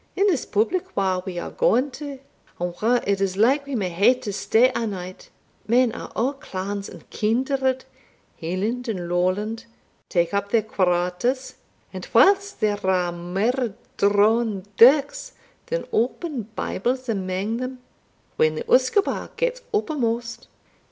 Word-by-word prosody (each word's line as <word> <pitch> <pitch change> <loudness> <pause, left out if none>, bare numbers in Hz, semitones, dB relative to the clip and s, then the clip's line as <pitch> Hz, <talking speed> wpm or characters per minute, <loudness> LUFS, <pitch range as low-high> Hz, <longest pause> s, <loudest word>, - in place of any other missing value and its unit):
In 395 - +2
this 350 -10 +1
public 230 - 0
whar 190 -2 +1
we 180 -2 -5
are - - -4
gaun 260 +4 +2
to, 280 +1 -7 0.4
and 175 0 -2
whar 240 +3 +3
it 200 0 0
is 190 -1 0
like 270 +7 +3
we 280 - -3
may 195 -5 -1
hae 200 +9 +4
to 210 -5 -6
stay 235 +5 +3
a' 230 - -1
night, 185 -2 -7 0.4
men 240 +1 +4
o' - - -6 0.2
a' - - -6
clans 200 -6 -5
and - - -13
kindred 260 +4 0 0.6
Hieland 205 +9 -2
and 185 -6 -3
Lawland 185 +6 -1 0.4
tak 170 -1 +1
up 200 0 -1
their 225 0 +2
quarters 185 +6 0 0.4
And - - -6
whiles 400 +1 +4
there 205 -1 -1
are 180 -2 +1
mair 195 +7 -1 0.2
drawn 205 0 +3
dirks 300 - +5 0.3
than - - -2
open 250 - -1
Bibles 255 +6 -2
amang 195 +1 -2
them, 255 +1 -4 0.6
when 155 0 +3
the - - -3
usquebaugh 260 +11 +1
gets - - -1
uppermost. 240 - -2
225 Hz, 145 wpm, -23 LUFS, 190-260 Hz, 0.6 s, dirks